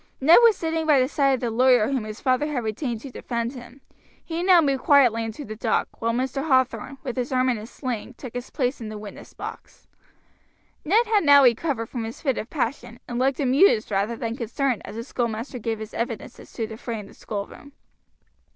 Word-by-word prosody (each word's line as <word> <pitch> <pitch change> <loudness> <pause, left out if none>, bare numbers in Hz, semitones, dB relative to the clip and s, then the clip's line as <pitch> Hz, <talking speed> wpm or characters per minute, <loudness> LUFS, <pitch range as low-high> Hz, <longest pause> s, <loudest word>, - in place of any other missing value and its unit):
Ned 320 - +7
was 460 -4 +6
sitting 325 -1 -2
by 295 -3 +5
the 255 - +3
side 275 -1 +2
of 255 - -7
the 240 -2 -1
lawyer 245 -1 +4
whom 260 -5 -1
his 215 0 -7
father 260 +2 +1
had 275 -6 -2
retained 230 +1 -3
to 275 - -9
defend 235 0 -3
him; 245 +1 -12 0.4
he 330 0 -3
now 365 -1 +6
moved 275 -5 +1
quietly 245 -6 +5
into 225 +6 -6
the 215 - -7
dock, 225 0 0
while 230 0 +1
Mr. 265 +5 -2
Hathorn, 260 -1 +1
with 250 - -4
his 250 +2 -2
arm 255 0 +2
in 240 -3 0
a 215 - -9
sling, 245 -2 -5
took 250 -2 -9
his 245 +1 -6
place 255 -1 -2
in 220 - -5
the 215 - -6
witness 210 -1 -11
box. - - -9 1.0
Ned 430 +9 +3
had 390 -11 +5
recovered 250 0 +2
now 225 - -13
from 240 -3 -3
his 225 - -7
fit 270 -5 -1
of 220 - -6
passion, 245 -4 -3
and 240 0 -3
looked 265 +1 +1
amused 270 - +3
rather 200 +4 0
than 230 0 -4
concerned 245 +1 -1
as - - -9
the 230 - -4
schoolmaster 235 0 -3
gave 225 0 -2
his 220 0 -8
evidence 230 0 -4
as - - -14
to 225 - -2
the 220 0 -9
fray 230 -1 -5
in 205 - -8
the - - -15
schoolroom. 215 +7 -7
250 Hz, 220 wpm, -24 LUFS, 230-275 Hz, 1.0 s, Ned